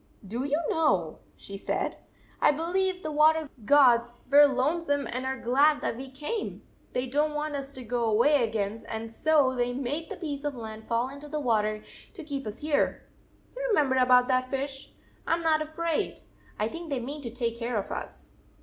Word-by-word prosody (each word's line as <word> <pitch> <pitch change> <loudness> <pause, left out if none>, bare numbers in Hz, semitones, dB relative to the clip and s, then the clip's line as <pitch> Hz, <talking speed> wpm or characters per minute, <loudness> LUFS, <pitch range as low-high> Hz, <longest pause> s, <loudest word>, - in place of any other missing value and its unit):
"Do 235 +6 -3
you 290 +2 +1
know," 190 - +1 0.2
she 195 - -8
said, - - -2 0.2
" - - -30
I - - +6
believe 365 +4 -1
the 310 - -3
water 310 +1 +4 0.2
gods 240 -4 +5 0.2
were 290 +1 +9
lonesome 285 +2 0
and 255 +2 -3
are 265 0 -2
glad 285 +6 +3
that - - -1
we 265 +2 -7
came! 300 - -4 0.3
They 250 - 0
don 290 +4 +1
t 300 - -8
want 300 0 -2
us 275 0 -4
to 260 - -8
go 240 0 -1
away 245 +5 +4
again, 220 0 -2
and 225 0 -5
so 295 -2 +3
they 245 0 0
made 275 +5 -3
the - - -6
piece 290 -4 -5
of 290 -2 -2
land 220 -2 -8
fall 235 +2 +1
into 285 +2 -10
the 305 +1 -2
water 215 -5 0 0.3
to 340 - -7
keep 280 -5 -5
us 215 +2 -6
here! 295 -1 0 0.5
You - - -5
remember 295 - +3
about 250 -1 +5
that 255 0 +1
fish! 270 0 -4 0.4
I 330 - +3
m 335 - -5
not 315 -1 +3
afraid. 315 +1 -2 0.3
I 210 - 0
think 335 +7 -7
they 275 -3 -1
mean 280 +5 -5
to 240 - -5
take 235 -1 -2
care 235 0 -2
of 200 - -3
us." - - -7
270 Hz, 200 wpm, -28 LUFS, 240-300 Hz, 0.5 s, were